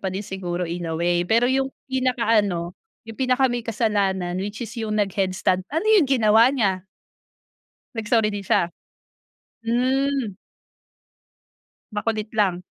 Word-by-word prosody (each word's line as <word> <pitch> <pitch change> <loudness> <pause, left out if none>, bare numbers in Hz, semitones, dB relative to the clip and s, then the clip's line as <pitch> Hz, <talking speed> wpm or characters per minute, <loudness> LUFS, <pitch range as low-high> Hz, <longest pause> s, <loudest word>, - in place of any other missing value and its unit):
pa 190 - -2
din 190 +2 -4
siguro 180 -2 -3
in 170 0 -4
a 160 - -2
way. 175 +1 +1
Pero 230 +5 +3
yung 265 0 +1 0.2
pinakaano 225 -9 +1 0.3
yung 225 - -8
pinaka 260 0 +3
may 245 -1 -2
kasalanan, 200 -5 0
which 205 +1 -5
is 220 +2 -9
yung 215 -1 -2
nag 200 -2 +1
head 190 -2 +1
stand, 185 0 0
ano 325 +8 -1
yung 345 -10 +4
ginawa 225 -1 +5
niya? 195 -8 0 1.1
Nag 225 -2 -4
sorry 225 -3 +3
din 205 -1 -4
siya? 175 0 +2 0.9
Hmm. 255 -1 0 1.6
Makulit 215 0 -2
lang. 190 -4 +1
215 Hz, 140 wpm, -23 LUFS, 185-240 Hz, 1.6 s, ginawa